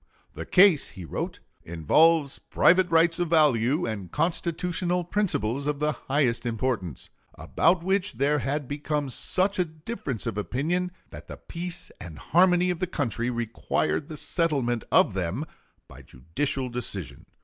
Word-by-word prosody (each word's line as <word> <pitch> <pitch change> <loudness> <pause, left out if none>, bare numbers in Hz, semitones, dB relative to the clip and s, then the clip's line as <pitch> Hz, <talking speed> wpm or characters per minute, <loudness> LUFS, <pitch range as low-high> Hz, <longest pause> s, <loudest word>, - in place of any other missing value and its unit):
"The - - -7
case," 185 -5 +5
he 90 -2 -10
wrote, - - -5 0.2
"involves 140 - +2
private 185 +1 +3
rights 165 +1 +3
of 175 - 0
value, 150 -2 +3
and 100 -6 -5
constitutional 175 +2 -1
principles 140 - -1
of 150 -1 0
the 150 +1 0
highest 135 -5 0
importance, 115 - -3 0.2
about 170 +1 +1
which 190 +1 +1
there 145 +2 +1
had 140 0 -2
become 145 0 -3
such 190 +8 0
a 180 - +3
difference 155 - -5
of 105 - -2
opinion 170 - -1 0.2
that - - -11
the - - -8
peace 175 +1 -6
and 85 -5 -9
harmony 180 - +3
of 175 - -4
the 185 - -1
country 120 - -2
required 120 +5 -2
the 155 - -7
settlement 140 -9 0
of - - +4
them 95 - -2 0.4
by - - -13
judicial 125 - -3
decision." 100 - -5
150 Hz, 145 wpm, -26 LUFS, 120-175 Hz, 0.4 s, case